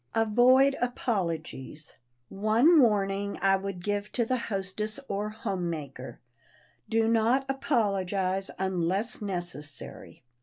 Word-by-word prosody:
[Sidenote: 225 -1 +2
AVOID 260 +3 +6
APOLOGIES] 170 - -3 0.4
One 225 - +4
warning 200 -3 +1
I 195 0 +4
would 190 -2 -5
give 205 +1 -2
to 235 - +1
the 255 - 0
hostess 210 +1 -3
or 205 +1 -2
homemaker: 170 -11 -5 0.7
Do 225 0 +2
not 230 +4 +2
apologize 195 -8 0
unless 190 +4 -1
necessary! 175 -11 -6
200 Hz, 105 wpm, -28 LUFS, 185-225 Hz, 0.7 s, AVOID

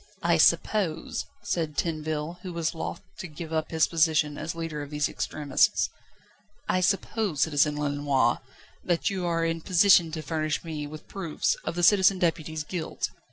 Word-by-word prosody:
"I - - +3
suppose," 170 -7 +2 0.2
said 165 -7 -2
Tinville, 155 0 -2
who 180 -2 -6
was 165 -1 -1
loth 165 +1 -5 0.2
to 180 - -5
give 160 +1 -8
up 160 -1 -1
his 160 -1 +3
position 155 -2 +2
as 160 +3 -5
leader 165 -3 -4
of 145 - -7
these 150 0 0
extremists 145 -3 +1 0.8
"I 185 - +1
suppose, 195 -3 0
Citizen 150 -1 +2
Lenoir, 145 -4 +1 0.4
that 175 +2 0
you 185 -2 -2
are 165 -1 +1
in 165 0 -1
position 180 -1 +5
to 160 -1 -4
furnish 155 +1 -2
me 155 -3 -5
with 155 +1 -10
proofs 170 -6 -1
of - - -3
the 175 - -2
Citizen 195 +1 +6
Deputy's 160 -3 -1
guilt?" 165 +1 -4
160 Hz, 160 wpm, -27 LUFS, 150-175 Hz, 0.8 s, Citizen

